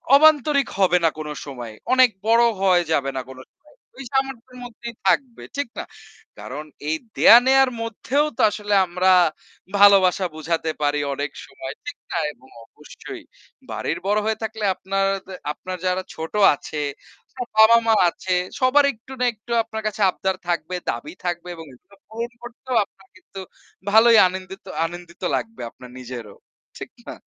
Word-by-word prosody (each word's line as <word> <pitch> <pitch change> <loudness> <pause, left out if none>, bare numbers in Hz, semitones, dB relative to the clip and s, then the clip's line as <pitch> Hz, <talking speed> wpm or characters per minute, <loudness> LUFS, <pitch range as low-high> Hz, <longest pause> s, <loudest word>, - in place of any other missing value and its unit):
অবান্তরিক 295 -2 +5
হবে 180 -2 +4
না 165 - +5
কোনো 150 -1 -5
সময় 125 -5 -7 0.2
অনেক 255 -1 +6 0.2
বড় 230 +1 +5 0.2
হয়ে 185 -2 +4
যাবে 140 -3 +1
না 130 - -1
কোনো 130 0 -10
সময়। - - -72 0.4
ঐ - - -13
সামর্থ্যের 265 -2 -2
মধ্যেই 235 -1 -9
থাকবে, 255 -4 +1
ঠিক 285 - -1
না? - - -3 0.6
কারণ 145 +4 -7 0.3
এই 160 - +1 0.2
দেওয়া-নেওয়ার 265 +2 +7
মধ্যেও 255 +6 0
তো - - 0
আসলে 205 0 -3
আমরা 180 +1 +1 0.7
ভালোবাসা 195 -2 +6
বোঝাতে 160 +1 -2
পারি 145 0 +1
অনেক 145 +1 -3
সময়, 135 0 -8
ঠিক 290 - -6
না? - - -1 0.2
এবং 130 -1 -22 0.2
অবশ্যই - - -11 0.5
বাড়ির - - -3
বড়ো 210 +1 +2
হয়ে 220 -1 0
থাকলে 220 0 -5
আপনারদে 195 0 -2 0.2
আপনার 185 +4 -7
যারা 185 0 +1
ছোট 160 0 -7 0.2
আছে 150 - -7 0.5
আপনার 250 -2 -6
বাবা-মা 225 +1 +6 0.2
আছে 185 - -7 0.3
সবার 260 +3 +4
একটু 230 +3 -18
না 250 - +2
একটু 220 +2 -14
আপনার 220 -1 -6
কাছে 215 0 -4
আবদার 190 +1 -2
থাকবে 175 +1 -2
দাবি 145 +8 -4
থাকবে 175 0 -3
এবং 165 - -10
এগুলো 200 +10 -21
পূরণ 230 +2 -5
করতেও 250 +1 -6
আপনার 195 -1 -25
কিন্তু 195 +1 -12 0.5
ভালোই 225 +1 +7
আনেন্দিত 190 +1 -8 0.2
আনন্দিত 175 0 -9
লাগবে 225 -1 -5
আপনার 125 - -14
নিজেরও, 120 -5 -8 0.4
ঠিক - - -8 0.2
না? - - -5
195 Hz, 155 wpm, -22 LUFS, 165-235 Hz, 0.7 s, দেওয়া-নেওয়ার